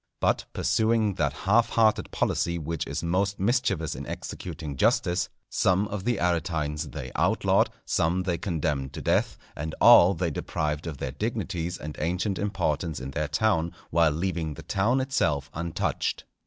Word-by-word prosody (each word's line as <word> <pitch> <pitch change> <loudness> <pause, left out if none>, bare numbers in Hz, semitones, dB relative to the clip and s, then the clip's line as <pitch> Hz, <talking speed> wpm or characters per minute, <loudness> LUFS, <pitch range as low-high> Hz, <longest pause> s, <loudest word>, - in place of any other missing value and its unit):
But - - +1
pursuing 110 -2 +2
that 70 -2 +2
half 100 +11 +2
hearted 110 -2 +2
policy 85 0 0
which 80 -1 -3
is 70 +3 -3
most 95 +4 0
mischievous 100 - +1
in - - -7
executing 75 -3 -6
justice, 90 +6 +2 0.2
some 95 +2 +2
of 100 -2 -5
the 120 -1 +1
Aretines 80 -3 -1
they - - -6
outlawed, - - +2 0.2
some 85 +3 +1
they 90 -3 -1
condemned 75 -6 -2
to - - -6
death, - - +1 0.2
and 80 +2 -4
all 90 +3 +8
they 85 -3 -1
deprived 75 +2 -2
of 75 -4 -5
their - - -4
dignities 85 +1 -3
and 75 0 -7
ancient 90 +5 -1
importance 80 -6 -1
in 65 +1 -6
their 75 +2 -1
town, 85 +1 +1 0.2
while 85 -1 +4
leaving 80 -1 -2
the - - -10
town 120 +7 +1
itself 75 - 0
untouched. 85 +1 -2
85 Hz, 155 wpm, -27 LUFS, 75-95 Hz, 0.2 s, all